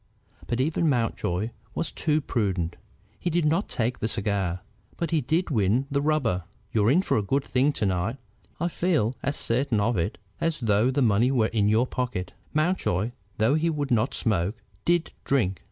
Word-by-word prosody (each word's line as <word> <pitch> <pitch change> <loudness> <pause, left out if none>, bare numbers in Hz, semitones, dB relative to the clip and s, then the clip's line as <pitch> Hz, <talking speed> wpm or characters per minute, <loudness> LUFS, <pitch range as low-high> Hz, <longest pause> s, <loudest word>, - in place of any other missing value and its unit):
But 120 - -1
even 155 +4 +2
Mountjoy 115 -5 0 0.2
was - - -1
too 155 -1 +1
prudent. 95 - -1 0.4
He 175 - -1
did 170 -1 +1
not 165 +7 +1
take 120 +1 0
the - - 0
cigar, 100 -5 -1 0.4
but 170 - -2
he 160 -2 +2
did 160 +7 0
win 110 +2 +2
the 140 0 +1
rubber. 135 - +1 0.3
"You're 110 -1 +3
in 170 +8 +4
for - - +1
a - - +2
good 135 +8 0
thing 135 +3 +2
to 110 - -1
night, 95 +6 0 0.4
I 170 - +1
feel 160 - +1
as 140 +1 -1
certain 120 -1 0
of 110 +2 +1
it 85 +5 -1 0.2
as 165 -2 0
though 110 0 +3
the 135 +1 +2
money 115 +2 +4
were 120 -5 +2
in 105 -2 +3
your 110 +4 +4
pocket." 125 -8 -3 0.2
Mountjoy, 155 - +1 0.3
though 110 +5 +3
he 160 +2 +2
would 145 -4 -2
not 120 +3 +2
smoke, 105 -1 0 0.3
did 175 -1 +2
drink. 105 -9 +1
120 Hz, 185 wpm, -26 LUFS, 105-150 Hz, 0.4 s, in